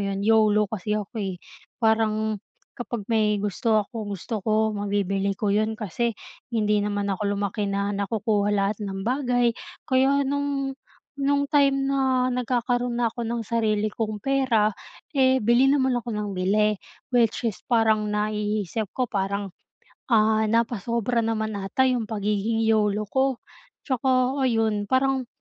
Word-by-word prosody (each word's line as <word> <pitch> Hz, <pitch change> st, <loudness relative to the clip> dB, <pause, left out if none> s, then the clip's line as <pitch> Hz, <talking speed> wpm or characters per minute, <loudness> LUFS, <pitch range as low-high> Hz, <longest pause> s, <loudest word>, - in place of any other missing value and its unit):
'yon, 195 Hz, 0 st, -3 dB
YOLO 215 Hz, -1 st, +4 dB
kasi 210 Hz, +1 st, -3 dB
ako, 210 Hz, +2 st, -5 dB
eh. 190 Hz, -2 st, -3 dB, 0.4 s
Parang, 220 Hz, -2 st, +1 dB, 0.3 s
kapag 235 Hz, -3 st, -5 dB
may 215 Hz, -1 st, +3 dB
gusto 210 Hz, +1 st, +1 dB
ako, 230 Hz, -, -12 dB, 0.2 s
gusto 215 Hz, +3 st, -4 dB
ko 220 Hz, +2 st, +1 dB
mabibili 200 Hz, -1 st, -1 dB
ko 205 Hz, 0 st, 0 dB
'yon 215 Hz, +1 st, +1 dB
kasi, 225 Hz, +2 st, -2 dB, 0.3 s
hindi 210 Hz, -3 st, +1 dB
naman 205 Hz, -1 st, -1 dB
ako 200 Hz, +2 st, -2 dB
lumaki 200 Hz, +1 st, -2 dB
na 200 Hz, +1 st, -1 dB
nakukuha 205 Hz, 0 st, 0 dB
lahat 200 Hz, +1 st, 0 dB
ng 195 Hz, -1 st, -4 dB
bagay. 245 Hz, -2 st, +1 dB, 0.3 s
Kaya 270 Hz, +2 st, +3 dB
no'ng 280 Hz, 0 st, -1 dB, 0.4 s
no'ng 280 Hz, 0 st, +1 dB
time 275 Hz, -2 st, +3 dB
na 265 Hz, -2 st, +2 dB
nagkakaroon 245 Hz, 0 st, -1 dB
na 240 Hz, -, +2 dB
ako 235 Hz, +2 st, -3 dB
ng 230 Hz, 0 st, -2 dB
sarili 215 Hz, -2 st, +1 dB
kong 215 Hz, 0 st, -3 dB
pera, 235 Hz, -5 st, +1 dB, 0.4 s
eh, 260 Hz, -1 st, +4 dB
bili 240 Hz, +4 st, +4 dB
naman 265 Hz, -3 st, +2 dB
ako 240 Hz, 0 st, -3 dB
nang 210 Hz, -2 st, -3 dB
bili. 210 Hz, +3 st, +2 dB, 0.4 s
Which 235 Hz, 0 st, +2 dB
is 215 Hz, -, -3 dB
parang 220 Hz, -2 st, +3 dB
naiisip 210 Hz, -1 st, -2 dB
ko 255 Hz, -1 st, -1 dB
parang, 200 Hz, -1 st, -3 dB, 0.5 s
ah, 220 Hz, -2 st, +3 dB
napasobra 235 Hz, +1 st, 0 dB
naman 220 Hz, -1 st, -1 dB
'ata 195 Hz, +7 st, 0 dB
'yong 250 Hz, -4 st, +1 dB
pagiging 210 Hz, +1 st, -1 dB
YOLO 215 Hz, -1 st, +2 dB
ko. 265 Hz, -2 st, 0 dB, 0.4 s
Tsaka 260 Hz, 0 st, +1 dB
ayon, 220 Hz, -3 st, 0 dB
parang, 260 Hz, 0 st, +1 dB
220 Hz, 140 wpm, -25 LUFS, 205-245 Hz, 0.5 s, YOLO